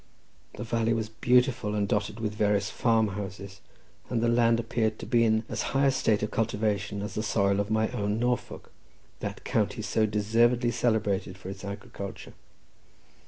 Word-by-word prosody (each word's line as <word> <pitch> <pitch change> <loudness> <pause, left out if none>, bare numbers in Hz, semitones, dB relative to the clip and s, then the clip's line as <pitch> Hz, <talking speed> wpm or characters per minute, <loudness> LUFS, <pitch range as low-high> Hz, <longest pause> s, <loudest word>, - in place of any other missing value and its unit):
The 105 - -5
valley 115 0 0
was 110 -1 -2
beautiful, 120 -1 +2
and 100 -1 0
dotted 105 +2 -1
with 110 -2 -2
various 105 -1 +1
farm 115 -2 +2
houses, 100 -1 -7 0.5
and 120 - 0
the 120 - +1
land 115 -1 +3
appeared 110 -1 -1
to - - -7
be 120 -1 +3
in 110 0 +2
as - - -3 0.2
high 140 - +4
a 135 - +5
state 110 -5 +1
of 105 - -2
cultivation 105 -2 -1
as 105 - -5
the 105 - -2
soil 100 -2 +1
of 100 0 -1
my 110 0 +2
own 105 +1 -1
Norfolk—that 120 +1 -5
county - - -1
so 110 -1 +1
deservedly 115 +4 +2
celebrated 105 -5 0
for 95 0 -8
its 95 0 -10
agriculture. 100 0 -7
110 Hz, 165 wpm, -28 LUFS, 105-115 Hz, 0.5 s, a